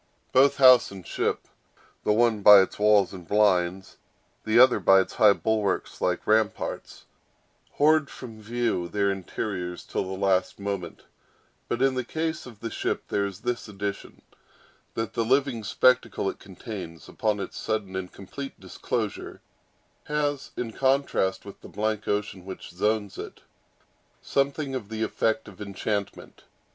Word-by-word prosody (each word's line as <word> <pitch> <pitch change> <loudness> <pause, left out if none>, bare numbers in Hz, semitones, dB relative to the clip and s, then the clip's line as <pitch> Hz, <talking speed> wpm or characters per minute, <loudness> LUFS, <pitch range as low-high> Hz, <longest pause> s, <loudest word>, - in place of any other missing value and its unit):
Both 135 +2 +4
house 130 -2 +7
and 95 -3 -11
ship—the - - -4
one 110 -1 +3
by 100 -1 +9
its 95 - -3
walls 105 -3 +4
and 90 -3 -10
blinds, 95 -3 +1 0.5
the 110 +1 +2
other 125 0 +7
by 95 0 +6
its - - -6
high 105 -2 +6
bulwarks 110 -2 -1
like 90 -1 0
ramparts—hoard 140 +7 -1
from 115 -4 -10
view 115 -5 -1
their 100 +2 0
interiors 95 -1 -4
till - - -3
the 95 0 -5
last 95 -1 +1
moment: 100 -2 -5 0.6
but 120 +2 -1
in 135 -1 +3
the 130 -1 -2
case 160 +3 -3
of 115 -4 -13
the 115 -1 -4
ship - - -3
there 100 0 0
is 100 0 -9
this 120 -1 -3
addition; 100 0 -6 0.7
that 115 -2 -3
the 115 - 0
living 130 -1 +1
spectacle 125 -1 +2
it - - -17
contains, 95 - -9
upon 105 -2 -1
its - - -6
sudden 105 -4 -3
and 95 -1 -4
complete 135 +8 -9
disclosure, 95 -2 -4 0.7
has, 145 -2 -2
in 115 -2 -4
contrast 130 -9 +1
with 100 - -11
the - - -12
blank 110 0 -2
ocean 105 -2 -2
which 95 -1 -9
zones 105 +3 -1
it, - - -8 0.8
something 140 0 -1
of 115 -6 -5
the 110 0 -3
effect 110 0 -1
of 100 -2 -13
enchantment. 100 0 -4
105 Hz, 145 wpm, -26 LUFS, 95-120 Hz, 0.8 s, by